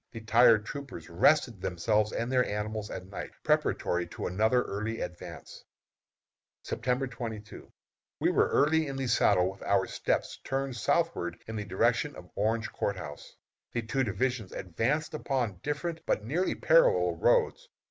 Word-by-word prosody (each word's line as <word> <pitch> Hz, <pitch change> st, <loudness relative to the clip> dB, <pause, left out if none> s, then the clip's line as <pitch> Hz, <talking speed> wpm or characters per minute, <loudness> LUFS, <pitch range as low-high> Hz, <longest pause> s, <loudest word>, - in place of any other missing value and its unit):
The 115 Hz, -, -8 dB
tired 115 Hz, -1 st, +5 dB
troopers 140 Hz, -, -7 dB
rested 115 Hz, -, +3 dB
themselves 105 Hz, +5 st, +1 dB
and 115 Hz, +2 st, -2 dB
their 125 Hz, -1 st, +4 dB
animals 105 Hz, 0 st, -3 dB
at 90 Hz, -, -6 dB
night, 95 Hz, +1 st, -7 dB
preparatory 90 Hz, 0 st, +1 dB
to -, -, -6 dB
another 110 Hz, +7 st, +2 dB
early 110 Hz, +3 st, -3 dB
advance. 90 Hz, 0 st, -8 dB, 1.0 s
September 125 Hz, +3 st, -1 dB
22. 115 Hz, -4 st, -7 dB, 0.5 s
We -, -, +2 dB
were -, -, +3 dB
early 155 Hz, +2 st, +3 dB
in 135 Hz, -, -4 dB
the 135 Hz, 0 st, -2 dB
saddle, 95 Hz, -6 st, +3 dB
with 95 Hz, -, -15 dB
our 100 Hz, -1 st, +2 dB
steps -, -, -2 dB
turned 135 Hz, -1 st, -2 dB
southward 120 Hz, -, 0 dB
in 110 Hz, -, -6 dB
the 105 Hz, -1 st, -3 dB
direction 115 Hz, +9 st, +1 dB
of 90 Hz, -, -12 dB
Orange 110 Hz, +2 st, 0 dB
Court 100 Hz, -, -1 dB
House. 75 Hz, -5 st, -9 dB, 0.4 s
The 115 Hz, -, -1 dB
two 130 Hz, +4 st, 0 dB
divisions 120 Hz, 0 st, -1 dB
advanced 120 Hz, -, -1 dB
upon 125 Hz, -10 st, -2 dB
different 160 Hz, +3 st, -3 dB
but 105 Hz, -, 0 dB
nearly 170 Hz, +10 st, 0 dB
parallel -, -, +4 dB
roads. -, -, +2 dB
115 Hz, 150 wpm, -29 LUFS, 100-135 Hz, 1.0 s, tired